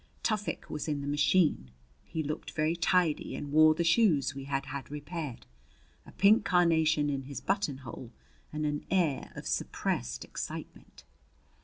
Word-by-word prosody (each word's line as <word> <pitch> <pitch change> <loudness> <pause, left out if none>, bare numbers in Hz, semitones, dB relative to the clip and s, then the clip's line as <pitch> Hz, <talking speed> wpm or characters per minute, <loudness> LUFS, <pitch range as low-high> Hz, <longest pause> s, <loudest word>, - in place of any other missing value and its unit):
Tufik 210 -2 -1
was 150 - -5
in 145 -2 -1
the 140 - -5
machine. 145 - +2 0.3
He 160 - -4
looked 150 +1 -4
very 155 +2 +1
tidy 170 -2 +1
and 145 - -6
wore 155 +1 +6
the 170 - 0
shoes 165 - +3
we 135 0 -7
had 135 0 -2
had 140 -1 -6
repaired, 150 -2 -6 0.6
a - - -11
pink 205 +3 +5
carnation 160 -5 +3
in 135 -2 -2
his 140 0 -6
buttonhole, 140 - -3 0.4
and 150 0 -2
an 150 0 -2
air 170 -7 +1
of - - -8
suppressed 60 +1 -2
excitement. - - -8
150 Hz, 150 wpm, -30 LUFS, 140-170 Hz, 0.6 s, wore